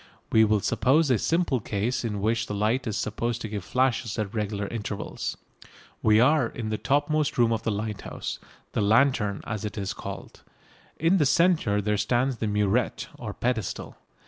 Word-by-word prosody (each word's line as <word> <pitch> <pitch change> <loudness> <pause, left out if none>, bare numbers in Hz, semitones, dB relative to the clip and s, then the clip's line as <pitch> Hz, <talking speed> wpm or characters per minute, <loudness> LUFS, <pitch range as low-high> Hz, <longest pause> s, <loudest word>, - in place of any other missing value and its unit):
We 110 0 +6
will 105 -1 +2
suppose 135 +7 +3
a 120 - +3
simple 165 -6 +1
case 110 +4 -2
in 105 -4 -2
which 110 +1 0
the 105 - -3
light 110 +5 0
is 110 -2 -2
supposed 115 +2 -2
to - - -3
give 105 -3 -5
flashes 125 -3 0
at 105 -3 -2
regular 105 -2 -2
intervals. 105 -2 -4 0.6
We 110 0 +5
are 130 +1 +4
in 115 -1 -5
the 110 - -2
topmost 145 +1 +1
room 120 -2 +4
of 110 - -1
the 115 - -1
lighthouse, 105 0 -4 0.3
the - - -1
lantern, 105 -2 +3
as 110 -2 -4
it 105 0 -5
is 100 -2 -2
called. - - -8 0.6
In 165 +5 +3
the 150 -5 +3
centre 150 - +3
there 105 0 +1
stands 125 +4 +1
the 110 - -2
murette 105 +6 0
or 110 -3 -5
pedestal. 115 -2 -3
110 Hz, 175 wpm, -26 LUFS, 105-130 Hz, 0.6 s, We